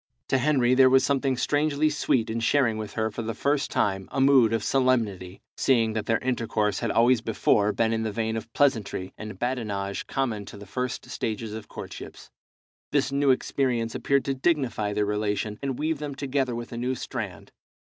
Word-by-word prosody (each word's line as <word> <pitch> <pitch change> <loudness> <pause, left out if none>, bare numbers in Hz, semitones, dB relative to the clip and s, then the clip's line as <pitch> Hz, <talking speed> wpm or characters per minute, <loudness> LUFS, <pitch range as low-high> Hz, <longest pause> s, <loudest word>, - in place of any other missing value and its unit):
To 135 - +3
Henry 130 -3 +3
there 130 0 +6
was 130 0 +5
something 135 -2 +1
strangely 150 +2 +1
sweet 125 -6 0
in 115 - -2
sharing 115 -2 +2
with 105 -1 -6
her 110 0 -1
for 115 - -5
the 115 -1 -4
first 140 +3 0
time 95 -1 0
a - - -2
mood 135 -4 +5
of 115 -2 0
solemnity, 110 -8 0
seeing 115 -5 +2
that 110 -1 -3
their 115 - +3
intercourse 115 -5 -1
had - - -2
always 120 0 +4
before 105 -2 +2
been 115 +2 +1
in 110 - 0
the 110 -1 -2
vein 110 +1 -2
of 115 0 -6
pleasantry 110 -9 0
and 110 0 -8
badinage 105 -6 -3
common 120 -6 -1
to - - -10
the 100 - -10
first 125 +5 -4
stages 110 -1 -3
of 110 -1 -7
courtships. - - -9 0.6
This 140 -1 +1
new 140 0 +2
experience 125 -3 +1
appeared 140 -1 +1
to 135 - 0
dignify 130 -7 0
their 105 0 +1
relation, 105 0 -2
and 135 -2 -2
weave 155 0 -1
them 145 -2 -5
together 135 -3 -1
with 120 0 -6
a 120 - -6
new 125 +2 -1
strand. - - -6
120 Hz, 190 wpm, -26 LUFS, 110-135 Hz, 0.6 s, there